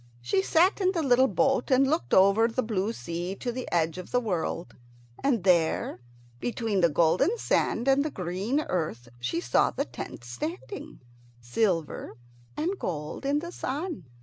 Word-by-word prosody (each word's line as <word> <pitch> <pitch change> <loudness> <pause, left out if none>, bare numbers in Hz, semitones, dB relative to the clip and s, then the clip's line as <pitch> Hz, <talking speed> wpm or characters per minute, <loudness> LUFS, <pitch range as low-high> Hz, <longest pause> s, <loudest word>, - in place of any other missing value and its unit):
She 125 +11 +1
sat 350 - +3
in 375 0 +3
the 335 -4 0
little 260 -1 +5
boat 265 +4 +1
and 265 0 +4
looked 315 +4 0
over 200 +4 +5
the 245 +2 -1
blue 215 -1 -1
sea 175 - -4
to 245 - -3
the 255 +1 -6
edge 165 0 +1
of 180 - -8
the 245 - +2
world, 180 -6 -3 0.5
and 245 -9 +2
there, 170 -8 +2 0.4
between 225 - -1
the 170 - +5
golden 175 - +3
sand 240 - 0
and 270 +1 +4
the 310 - -1
green 195 - -2
earth, 155 - -3
she 125 +7 -1
saw 120 -7 +2
the - - -2
tent - - -8
standing, 320 - -6 0.4
silver 165 - -1 0.4
and 360 +6 -1
gold 155 - -4
in 285 +1 +2
the 345 +1 -6
sun. 295 - -4
215 Hz, 165 wpm, -27 LUFS, 170-275 Hz, 0.5 s, little